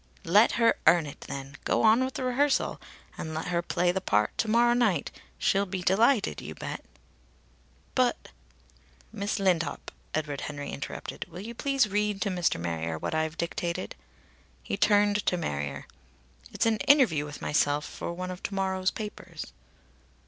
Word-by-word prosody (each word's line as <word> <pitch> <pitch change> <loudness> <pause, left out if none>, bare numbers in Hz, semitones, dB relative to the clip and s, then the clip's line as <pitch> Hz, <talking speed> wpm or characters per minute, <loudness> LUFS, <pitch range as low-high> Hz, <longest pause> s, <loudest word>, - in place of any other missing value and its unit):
"Let 205 +7 +5
her 230 -1 +3
earn 165 0 +6
it, 145 - -9
then. 135 +1 -7
Go - - +1
on 225 +3 +6
with 260 0 -3
the - - -3
rehearsal. 265 +3 +1 0.4
And 160 0 -4
let 160 +3 -3
her 170 -1 +1
play 175 0 +1
the 190 +1 -2
part 105 - +1
to 225 - +1
morrow 235 +2 +4
night. 215 -11 +1 0.3
She'll 200 +1 +2
be 185 -1 -4
delighted, 220 +5 +3
you - - -7
bet." - - -6 1.1
"But 255 -2 +1 0.4
" - - -30
"Miss 200 +2 -2
Lindop," 180 -6 0 0.2
Edward 150 -3 -2
Henry 145 -1 -5
interrupted, 70 - -6
"will 180 - -8
you 230 +3 -7
please 275 0 +1
read 210 0 0
to 205 - -1
Mr. 175 - +1
Marrier 80 -1 -2
what - - -3
I've 160 0 -1
dictated?" 170 +1 -3 0.7
He - - -2
turned 205 0 +3
to 180 - +3
Marrier. 75 - -3 0.7
"It's - - 0
an 225 -1 +3
interview 260 - +4
with 150 0 -8
myself 150 0 +1
for - - -5
one 185 +1 -5
of 180 - -8
to 200 - -4
morrow's 190 -1 +1
papers." 185 -6 -7
185 Hz, 165 wpm, -28 LUFS, 155-215 Hz, 1.1 s, earn